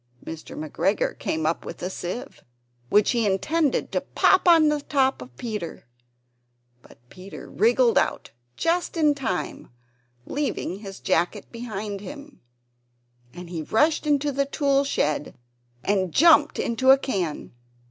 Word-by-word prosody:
Mr. 160 -1 -8
McGregor 155 +6 -1
came 160 0 -2
up 160 +2 0
with - - -8
a - - -1
sieve, 185 +7 -6 0.5
which 210 +5 +4
he 235 -2 +1
intended 280 - 0
to - - 0
pop 380 - +3
upon 330 -3 +6
the 300 -1 +1
top 270 -2 +1
of 125 -1 -12
Peter, 210 - -5 1.0
but - - -18
Peter 185 +2 -11
wriggled 235 +2 +3
out - - -2 0.3
just 345 +1 0
in 305 -2 +4
time, 230 -10 -4 0.6
leaving 275 -9 -3
his 195 -2 -9
jacket 185 +3 -1
behind 215 -4 -5
him; 285 +4 -10 0.9
and 170 -3 -7
rushed 300 +7 +2
into 290 0 +2
the 275 0 0
tool 280 -1 +1
shed, 150 - -1 0.5
and 190 -3 0
jumped 305 - +5
into 235 +3 0
a 270 - +9
can. 190 - -3
235 Hz, 135 wpm, -24 LUFS, 185-285 Hz, 1.0 s, a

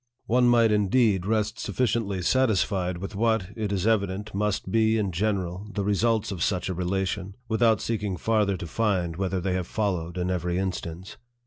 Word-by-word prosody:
One 125 +1 +3
might, 115 -2 +5
indeed, 105 -2 +2
rest 110 0 0
sufficiently 110 -6 -1
satisfied 95 -6 +1
with 95 +3 -6
what, 110 -3 +1
it 105 -3 -2
is 100 -1 -1
evident, 105 -2 0
must 100 -1 -1
be, 110 0 +3
in 100 -3 0
general, 95 0 -2
the 100 -2 -2
results 105 +2 +1
of 90 -4 -5
such 90 0 0
a - - -1
relation, 95 +2 -2
without 110 -1 +3
seeking 105 -5 -2
farther 105 0 +1
to 85 - -6
find 90 -2 0
whether 95 +1 -1
they 90 +1 -1
have 90 -1 -2
followed 90 -5 -2
in 90 0 -1
every 90 -1 -1
instance. 95 0 -4
100 Hz, 175 wpm, -26 LUFS, 90-110 Hz, -, might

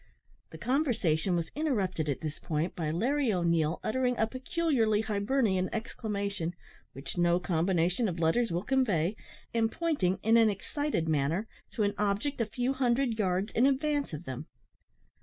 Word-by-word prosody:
The 160 - -10
conversation 210 - +1
was 170 -1 -2
interrupted 195 - -1
at 140 - -2
this 155 -2 -5
point 160 +2 -2
by 160 -3 -2
Larry 245 - +1
O'Neil 170 -3 +1
uttering 250 +1 0
a 220 - +3
peculiarly 255 -4 +1
Hibernian 205 -3 +1
exclamation, 200 -6 -3 0.4
(which 135 +6 -6
no 175 0 +3
combination 180 +4 +1
of 175 - -4
letters 170 +7 +2
will 175 +2 -1
convey,) 210 -8 +1 0.4
and 225 -1 +2
pointing 290 - 0
in 225 +2 +5
an 225 -1 +6
excited 210 - -2
manner 160 +7 0 0.3
to 215 - 0
an 205 0 +1
object 210 +7 0
a 225 - 0
few 245 +4 -1
hundred 245 -2 +1
yards 190 +1 0
in 250 +4 +4
advance 290 +1 0
of 155 +1 -6
them. 130 -6 -6
205 Hz, 155 wpm, -30 LUFS, 170-250 Hz, 0.4 s, an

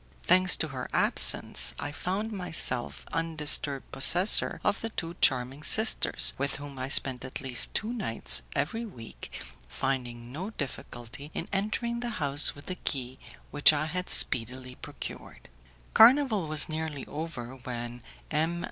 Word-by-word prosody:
Thanks 185 +1 +3
to 160 - -4
her 130 -2 -7
absence, - - +5
I 145 - -6
found 195 +8 -4
myself 160 - -2
undisturbed 150 -4 -1
possessor 180 +9 +3
of - - -1
the 225 - -5
two 170 -5 -7
charming 130 +2 0
sisters, 220 +7 +4
with 140 +1 -2
whom 140 -1 -10
I 130 +1 -5
spent 130 -2 +5
at 130 - -6
least 130 -3 +1
two 220 +3 -2
nights 115 - 0
every 225 +11 -3
week, 120 - -12 0.4
finding 120 - -5
no 180 +9 -6
difficulty 140 - -9
in 165 - -5
entering 220 +4 -3
the 240 0 -5
house 145 0 0
with 145 - -15
the 185 - -6
key 130 -5 -4 0.3
which 145 +1 +5
I 150 +1 -2
had 180 +3 -5
speedily 125 +1 0
procured. - - -10 0.4
Carnival 230 - +4
was 155 -1 +2
nearly 155 -3 -6
over, 135 -5 -8
when 120 -1 -8 0.3
M. 160 +3 -1
145 Hz, 145 wpm, -27 LUFS, 130-180 Hz, 0.4 s, absence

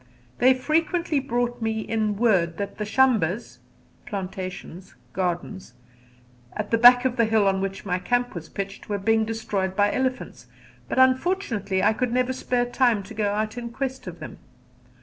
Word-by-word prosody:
They 255 +1 +5
frequently 315 +3 0
brought 245 -2 -2
me 220 0 -1
in 215 -2 -1
word 185 -8 +2
that 200 +1 -5
the 210 - -2
shambas 220 - +1 0.5
(plantations, 185 - -7 0.2
gardens) 180 -5 -3 0.8
at 210 -1 -5
the 230 - +3
back 245 +1 +8
of 255 0 0
the 230 - +4
hill 220 -2 +2
on 190 0 +1
which 195 +1 -4
my 180 -1 -1
camp 245 +4 0
was 165 -2 -8
pitched 195 +1 -6
were 205 - 0
being 220 +2 +2
destroyed 205 -4 -2
by 205 +1 +2
elephants, 260 0 -3 0.4
but - - -3
unfortunately 260 - +1
I - - +4
could 250 +1 -1
never 255 +1 +1
spare 250 -1 -1
time 240 -4 +1
to 210 +4 -11
go 210 -2 0
out 215 +3 -2
in 235 -1 -6
quest 265 +2 -5
of - - -8
them. - - -9
220 Hz, 170 wpm, -24 LUFS, 195-250 Hz, 0.8 s, back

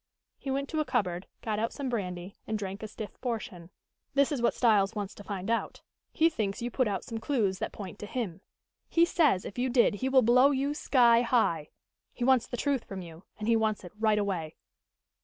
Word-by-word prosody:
He 275 - -6
went 275 +1 -1
to 315 - -1
a - - +3
cupboard, 180 -9 -1 0.2
got 215 -2 -1
out 225 +1 0
some 280 -2 -4
brandy 185 -5 -4
and 215 - -1
drank 195 0 -5
a 215 - -4
stiff 215 0 -9
portion. 225 -8 -4 0.5
"That 280 +1 +4
is 275 -5 -1
what 235 - +2
Styles 215 -3 +3
wants 205 -2 -4
to 205 - -11
find 195 -2 -5
out. 230 0 -2 0.3
He 325 - +4
thinks 220 -9 -2
you 240 0 -3
put 255 0 +1
out 200 -2 -2
some 230 -3 -5
clews 215 -8 0
that 220 - -3
point 200 0 -8
to 210 - -6
him. 200 -7 -4 0.5
He 335 0 +5
says 305 - +2
if 205 - -6
you 255 +1 +1
did 240 -2 +4
he 255 +6 -2
will 265 -1 +5
blow 250 +4 +6
you 280 +1 0
sky 240 -5 +4
high. 195 -11 +1 0.4
He 245 - -4
wants 260 -1 +4
the 245 - -5
truth 280 -3 0
from 190 -2 -6
you, 165 +1 -12
and 210 - -4
he 230 - +4
wants 220 -2 0
it 180 - -9
right 215 0 +2
away." 180 -6 -2
225 Hz, 220 wpm, -29 LUFS, 195-255 Hz, 0.5 s, blow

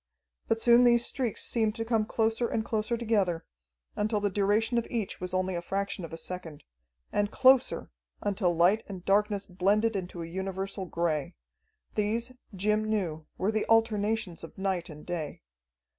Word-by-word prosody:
But 225 - +1
soon 235 +1 +6
these 240 -1 +5
streaks 245 -6 -2
seemed 220 -2 0
to 225 -1 -3
come 225 -2 +1
closer 225 +2 +1
and 220 -1 -1
closer 220 +1 -1
together, 205 -8 0 0.5
until 210 0 0
the 205 -1 0
duration 210 +4 +2
of 230 - -5
each 220 -7 -3
was 180 0 -4
only 185 0 0
a 170 - -2
fraction 195 +1 -2
of 165 - -7
a 165 - -6
second. 165 -3 -6 0.5
And 205 0 +1
closer, 260 +2 +4 0.3
until 200 -3 +1
light 180 +6 +4
and 185 -3 -8
darkness 205 0 +2
blended 205 +5 +1
into 180 -3 -4
a - - -6
universal 190 +2 -4
gray. 165 -4 -1 0.6
These, 225 +4 -1 0.2
Jim 210 +3 +1
knew, 180 -8 -2
were 195 +3 +1
the 215 -1 -1
alternations 220 -5 +2
of 165 - -10
night 190 -2 -1
and 150 -1 -10
day. 165 - -4
205 Hz, 165 wpm, -29 LUFS, 180-225 Hz, 0.6 s, soon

